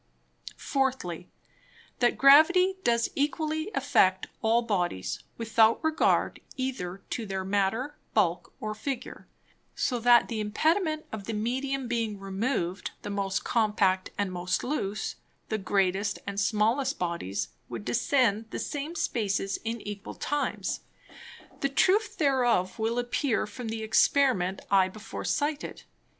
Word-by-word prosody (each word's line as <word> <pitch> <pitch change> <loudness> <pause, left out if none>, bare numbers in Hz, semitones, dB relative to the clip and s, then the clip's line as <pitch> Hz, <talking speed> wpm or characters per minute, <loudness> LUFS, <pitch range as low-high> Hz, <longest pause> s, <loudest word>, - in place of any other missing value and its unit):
Fourthly, 255 - -2 0.7
That 240 -1 +3
Gravity 355 +7 +6
does 235 0 +2
equally 310 +3 -1
affect 245 -9 +3 0.2
all 230 +1 +3
Bodies, 180 - -1 0.2
without 225 +1 +3
regard 315 0 +2 0.2
either 200 -8 -4
to 230 -3 -3
their 190 -1 -3
Matter, 205 +9 0 0.2
Bulk, 180 -5 +1
or 215 0 -3
Figure; 250 +3 -5 0.5
so 245 -2 0
that 240 0 +6
the 225 -2 -3
Impediment 310 - +1
of 215 -3 -6
the 225 - -3
Medium 260 +4 -2
being 230 -3 -1
removed, 195 -1 -2
the - - -4
most 195 -1 -1
compact 210 -5 +1
and 200 -2 -1
most 180 0 -1
loose, 215 -7 -2 0.3
the 220 - -1
greatest 195 +1 +1
and 200 0 -3
smallest 230 +7 +1
Bodies 170 - -2 0.2
would 115 -4 -6
descend 220 - +2
the - - -5
same 295 +3 -4
Spaces 200 - -1
in 225 0 -3
equal 205 -1 -7
Times; 290 0 -2 0.8
the 275 - 0
Truth 400 +10 +2
thereof 245 - +2
will 225 +2 0
appear 245 +1 0
from 240 +3 -7
the 220 0 -4
Experiment 220 -4 +3
I 190 -2 +5
before 215 +3 -8
cited. 295 0 -2
225 Hz, 130 wpm, -28 LUFS, 195-270 Hz, 0.8 s, Gravity